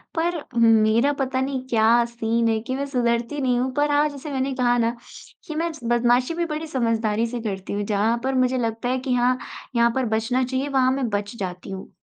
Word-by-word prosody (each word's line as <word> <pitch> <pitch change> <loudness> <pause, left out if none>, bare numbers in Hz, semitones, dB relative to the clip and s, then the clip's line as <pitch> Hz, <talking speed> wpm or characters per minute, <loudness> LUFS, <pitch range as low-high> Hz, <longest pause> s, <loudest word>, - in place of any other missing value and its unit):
पर 340 +1 0 0.2
मेरा 225 +4 +4
पता 260 -1 0
नहीं 265 -1 -2
क्या 230 +1 +4
सीन 230 0 -1
है 225 -1 +1
कि 260 - -1
मैं 280 +1 -2
सुधरती 240 +1 0
नहीं 250 -2 +2
हूँ। 260 +1 -1
पर 290 0 +2
आज 295 +1 +3
जैसे 285 +1 -8
मैंने 270 0 -1
कहा 245 -1 +2
ना 230 0 +1 0.5
कि 310 - -5
मैं 335 +2 -1 0.2
बदमाशी 240 +4 +2
भी 340 +1 -1
बड़ी 315 0 -4
समझदारी 230 -5 0
से 240 +1 -4
करती 195 -3 -4
हूँ। 205 - -1
जहाँ 215 +3 +1
पर 265 0 0
मुझे 255 0 +2
लगता 230 0 -2
है 255 +1 0
कि 255 0 -2
हाँ, 250 +1 +2 0.4
यहाँ 235 0 +4
पर 260 -1 +1
बचना 245 +4 0
चाहिए 260 +2 -2
वहाँ 260 -2 +3
मैं 265 -1 -1
बच 205 +2 -3
जाती 180 -1 -5
हूँ। 190 0 -8
245 Hz, 215 wpm, -23 LUFS, 230-265 Hz, 0.5 s, मेरा